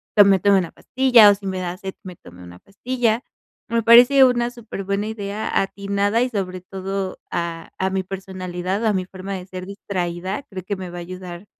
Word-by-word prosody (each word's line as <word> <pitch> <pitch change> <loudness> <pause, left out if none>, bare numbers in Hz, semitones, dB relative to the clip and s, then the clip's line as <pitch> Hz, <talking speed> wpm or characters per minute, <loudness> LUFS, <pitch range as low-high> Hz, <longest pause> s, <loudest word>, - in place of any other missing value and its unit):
pues, 205 -2 +8
me 195 -1 +5
tomo 200 +1 +4
una 175 -3 -4
pastilla, 250 -5 +5
o 205 - +5
si 200 0 -8
me 190 -1 -2
da 180 -1 -3
sed 190 0 -7
me 185 -1 -9
tome 90 - -15
una 90 0 -12
pastilla. 235 - -1 0.5
Me 230 0 +1
parece 245 +4 +8
una 240 -1 +1
superbuena 205 -4 -4
idea 210 -1 -2
atinada 200 +3 0
y 250 - +1
sobre 185 -5 -4
todo 190 +1 -5
a 170 -1 -4
a 190 - +1
mi 190 0 -1
personalidad, 185 +1 -4
a 215 - +3
mi 190 -1 0
forma 190 +1 -7
de 185 -2 -5
ser 185 -1 -7
distraída, 185 0 -4
creo 190 -6 -8
que 200 - -2
me 185 -1 -6
va 175 - -7
a - - -6
ayudar 180 +1 -8
195 Hz, 200 wpm, -21 LUFS, 185-215 Hz, 0.5 s, pues